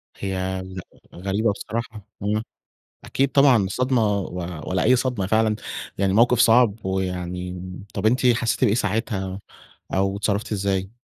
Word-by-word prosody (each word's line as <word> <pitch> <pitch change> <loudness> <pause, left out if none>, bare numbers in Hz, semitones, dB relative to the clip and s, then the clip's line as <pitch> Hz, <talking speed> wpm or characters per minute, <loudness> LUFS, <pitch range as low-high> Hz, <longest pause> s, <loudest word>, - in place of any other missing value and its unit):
هي 95 -1 -3
غ 95 - -4 0.4
غريبة 100 +4 +1
بصراحة. 110 -1 -6 0.2
امم، 105 +2 0 0.6
أكيد 135 +1 +1
طبعًا 140 -3 +6
الصدمة، 125 +5 +1 0.2
و 95 - -6 0.4
ولا 90 0 +1
أي 125 +3 +5
صدمة 120 -6 -1
فعلًا، 110 +1 +2 0.4
يعني 95 -1 +2
موقف 120 +3 +4
صعب. 115 -2 +5
ويعني، 90 -1 -3 0.3
طب 100 +2 -1
أنتِ 125 +3 +3
حسّيتِ 120 +1 +2
بإيه 110 -3 +3
ساعتها، 100 -4 -1 0.6
أو 95 +1 +1
اتصرفتِ 105 +2 -1
إزاي؟ 95 0 -1
105 Hz, 135 wpm, -23 LUFS, 95-115 Hz, 0.6 s, طبعًا